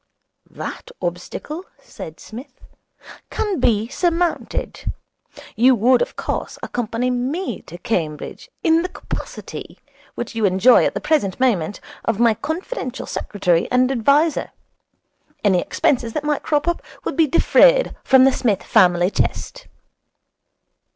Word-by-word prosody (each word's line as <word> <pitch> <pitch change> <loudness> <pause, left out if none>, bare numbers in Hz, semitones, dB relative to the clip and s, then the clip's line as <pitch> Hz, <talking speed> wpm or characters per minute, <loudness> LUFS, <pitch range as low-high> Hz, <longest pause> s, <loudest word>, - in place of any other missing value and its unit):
'That - - -7
obstacle,' 315 +5 -5 0.2
said 160 0 -10
Psmith, 255 +4 -11 0.7
'can 405 -7 -2
be 220 -3 +2
surmounted. 345 +4 -1 0.6
You 250 +4 +5
would, 245 +3 +4
of - - -2
course, - - -4
accompany 245 +1 -2
me 265 +10 -2
to 175 - -9
Cambridge, 160 -6 -3
in 325 0 +4
the 365 - -3
capacity, - - -7 0.4
which - - -5
you 225 -1 -2
enjoy 200 +6 +5
at - - -1
the - - -2
present 270 - 0
moment, 205 -8 +1 0.2
of 225 -2 -1
my 235 -1 +5
confidential 315 - -4
secretary 180 -5 0
and 255 +1 +3
adviser. 280 +6 +2 0.9
Any 190 -4 +4
expenses 235 -4 0
that 305 - -2
might 295 -1 0
crop 300 +1 0
up 345 - 0 0.2
would - - -3
be 325 -2 +4
defrayed - - +4
from 265 -1 +6
the 270 - +6
Psmith 210 -6 0
family 180 -3 +4
chest.' - - -2
250 Hz, 130 wpm, -21 LUFS, 210-310 Hz, 0.9 s, from